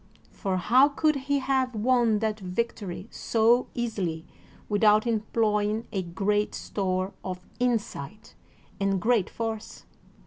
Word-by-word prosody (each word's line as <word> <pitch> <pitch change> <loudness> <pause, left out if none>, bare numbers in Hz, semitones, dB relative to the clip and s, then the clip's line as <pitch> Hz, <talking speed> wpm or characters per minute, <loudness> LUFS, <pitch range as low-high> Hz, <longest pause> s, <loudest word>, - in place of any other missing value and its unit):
For 190 -3 -2
how 255 +9 +5
could 305 +1 +2
he 280 +1 0
have 265 -2 0
won 235 0 +3
that 215 -1 -1
victory 195 -1 -4
so 235 +2 +2
easily 190 -9 -2 0.4
without 210 +1 +4
employing 215 -1 0
a 195 -4 -1
great 200 +4 -1
store 185 -1 -2
of 185 0 -6
insight 215 - -2 0.5
and 195 -1 +1
great 225 -1 +2
force? 225 -1 -5
215 Hz, 115 wpm, -27 LUFS, 195-240 Hz, 0.5 s, how